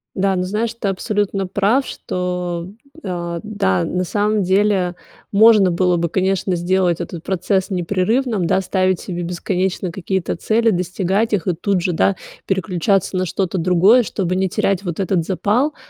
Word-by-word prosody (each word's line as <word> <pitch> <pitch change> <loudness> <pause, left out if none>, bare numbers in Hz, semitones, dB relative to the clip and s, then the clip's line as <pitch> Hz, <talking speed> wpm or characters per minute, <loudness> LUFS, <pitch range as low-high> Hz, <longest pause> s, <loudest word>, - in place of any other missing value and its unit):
Да, 195 0 +1
ну 180 - 0
знаешь, 215 +5 -2
ты 230 -3 -3
абсолютно 195 0 -1
прав, 205 +8 +1
что, 180 -1 -4 0.4
а, 170 -2 -3
да, 95 - 0
на 180 - -1
самом 205 +3 0
деле, 190 -1 +1 0.3
можно 210 -2 +6
было 180 0 +2
бы, 170 0 0
конечно, 190 +1 0
сделать 175 0 +1
этот 170 -1 -6
процесс 190 +1 -1
непрерывным, 200 +4 0
да. 180 +3 +2
Ставить 185 -1 0
себе 175 -2 -5
бесконечно 180 +1 -2
какие-то 190 0 -2
цели, 225 +6 +1
достигать 190 +3 0
их 195 -5 0
и 180 - +1
тут 185 +3 0
же, 180 +1 -1
да, 190 +3 +2 0.3
переключаться 190 0 0
на 185 - +1
что-то 190 +1 -2
другое, 185 +8 +5
чтобы 185 -5 -2
не 190 0 +1
терять 195 +1 0
вот 175 -3 -4
этот 185 -3 0
запал. 225 - 0
185 Hz, 160 wpm, -19 LUFS, 175-200 Hz, 0.4 s, можно